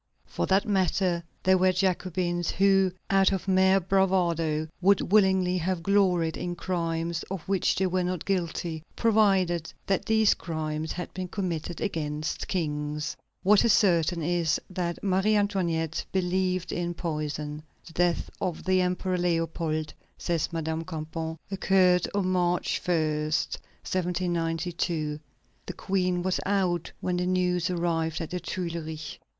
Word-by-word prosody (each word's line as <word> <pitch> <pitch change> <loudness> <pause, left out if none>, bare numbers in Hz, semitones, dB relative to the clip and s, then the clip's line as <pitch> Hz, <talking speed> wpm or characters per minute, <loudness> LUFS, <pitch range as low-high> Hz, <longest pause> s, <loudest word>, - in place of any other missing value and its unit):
For - - -3
that 195 +3 +2
matter, 185 -3 +1 0.2
there 185 0 +4
were 185 0 +4
Jacobins 180 -2 0
who, 195 -1 +3 0.2
out 195 0 +5
of 195 0 -2
mere 190 0 +4
bravado, 170 -5 +1
would 195 -1 +3
willingly 190 -3 +4
have 175 0 -2
gloried 180 -5 +2
in 175 -1 -3
crimes 170 -2 -2
of 190 -2 -4
which 195 -2 +2
they 190 - +1
were 185 0 0
not 180 -2 -3
guilty, 170 -3 -2
provided 195 -7 +2
that 195 -2 0
these 220 -2 +4
crimes 155 -1 -4
had 180 - -6
been 185 -1 -4
committed 175 -3 -3
against 155 -5 -3
kings. 150 -3 -2 0.3
What 205 +2 +5
is 230 - +5
certain 170 -3 +3
is, 170 -1 +1
that 175 -2 -3
Marie 195 +2 +2
Antoinette 170 -6 0
believed 185 -1 0
in 175 0 -2
poison. 150 -2 -3 0.2
"The 165 - -13
death 175 0 +1
of 180 -4 -2
the 185 0 +3
Emperor 180 0 0
Leopold," 165 -3 -1 0.2
says 170 -2 -1
Madame 160 0 -2
Campan, 160 0 -5
"occurred 185 -2 +3
on 200 -2 +1
March 180 -1 +1
1, 175 -1 +2
1792. 165 +1 -2 0.5
The - - -4
Queen 180 -2 0
was 185 0 0
out 185 -4 0
when 180 -1 -1
the 180 0 0
news 180 -1 +1
arrived 165 -2 -1
at 165 - -5
the 180 - -2
Tuileries. 165 -3 -5
180 Hz, 135 wpm, -27 LUFS, 165-190 Hz, 0.5 s, out